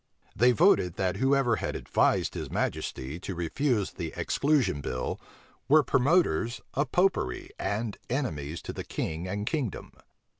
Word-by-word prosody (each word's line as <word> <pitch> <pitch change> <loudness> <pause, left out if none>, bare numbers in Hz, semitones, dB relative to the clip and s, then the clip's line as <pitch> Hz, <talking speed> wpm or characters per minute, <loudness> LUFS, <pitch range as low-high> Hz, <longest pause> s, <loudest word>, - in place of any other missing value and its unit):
They 125 +1 +5
voted, 125 - +4
that 95 -1 -1
whoever 135 -3 +3
had - - -3
advised - - +1
his - - -5
majesty 65 +6 -3
to 95 +1 -5
refuse 105 - 0
the 85 -3 -5
exclusion 135 - +1
bill, 65 -1 -3 0.5
were 155 +1 +6
promoters 130 - +2
of 145 +2 -1
Popery 180 - +1
and 105 0 -2
enemies 85 - -3
to - - -5
the - - -5
king 80 +3 -4
and 100 +2 -3
kingdom. 135 - -3
115 Hz, 140 wpm, -28 LUFS, 85-140 Hz, 0.5 s, were